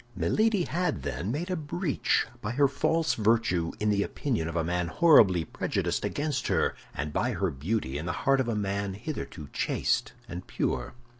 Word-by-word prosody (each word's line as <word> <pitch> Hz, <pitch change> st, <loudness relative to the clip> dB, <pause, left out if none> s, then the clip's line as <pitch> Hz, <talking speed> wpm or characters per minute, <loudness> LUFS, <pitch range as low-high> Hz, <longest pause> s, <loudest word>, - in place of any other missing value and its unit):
Milady 215 Hz, -4 st, +2 dB
had, 180 Hz, +2 st, -1 dB
then, 95 Hz, +6 st, -3 dB
made 170 Hz, +8 st, -3 dB
a -, -, +1 dB
breach 160 Hz, 0 st, 0 dB, 0.2 s
by 105 Hz, +3 st, -3 dB
her 140 Hz, +2 st, +4 dB
false 160 Hz, +4 st, +1 dB
virtue 110 Hz, -6 st, +2 dB
in 105 Hz, 0 st, +2 dB
the 100 Hz, -1 st, +2 dB
opinion 110 Hz, -, -1 dB
of 85 Hz, -, -5 dB
a 85 Hz, -, +1 dB
man 85 Hz, +1 st, -1 dB
horribly 100 Hz, -, +5 dB
prejudiced -, -, -2 dB
against 145 Hz, 0 st, -1 dB
her, -, -, +2 dB, 0.2 s
and 75 Hz, +2 st, -3 dB
by 120 Hz, +8 st, 0 dB
her 95 Hz, -3 st, 0 dB
beauty 75 Hz, 0 st, -2 dB
in 80 Hz, -, -5 dB
the -, -, 0 dB
heart 135 Hz, 0 st, +4 dB
of 130 Hz, -, +1 dB
a 115 Hz, -, 0 dB
man 100 Hz, -1 st, -2 dB
hitherto 100 Hz, -, -6 dB
chaste -, -, 0 dB
and 90 Hz, +1 st, -7 dB
pure. -, -, -2 dB
110 Hz, 180 wpm, -28 LUFS, 90-145 Hz, 0.2 s, horribly